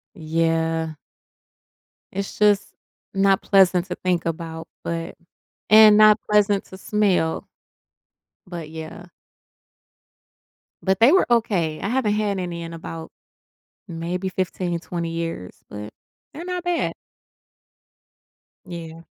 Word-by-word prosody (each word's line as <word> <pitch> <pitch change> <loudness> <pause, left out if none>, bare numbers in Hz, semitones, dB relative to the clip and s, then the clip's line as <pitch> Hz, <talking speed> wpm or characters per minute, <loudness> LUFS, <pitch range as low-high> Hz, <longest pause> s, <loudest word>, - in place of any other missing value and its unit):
Yeah. 165 -1 0 1.2
It's 200 +1 -4
just 210 -1 +3 0.4
not 195 -1 +3
pleasant 185 -3 +4
to 180 - -4
think 180 -2 -1
about 165 0 -4 0.2
but 165 0 -4 0.5
and 215 0 +9
not 215 0 +7
pleasant 205 -1 +3
to 190 - -11
smell. 195 -6 0 1.0
But 170 -4 -7
yeah. 160 +2 -8 1.8
But 190 -1 +1
they 240 +6 +7
were 380 - +5
okay, 190 -10 +1
I - - -3
haven't 235 -4 +1
had 210 -2 0
any 175 -2 -4
in 165 0 -7
about, 165 0 -8 0.8
maybe 175 +2 -3
15, 180 -2 -2
20 170 -2 -4
years 165 - -4 0.2
but 105 +1 -7 0.4
they're 315 +4 -8
not 360 0 -4
bad. 350 -1 0 1.7
Yeah. 165 -2 -8
180 Hz, 110 wpm, -23 LUFS, 165-205 Hz, 1.8 s, and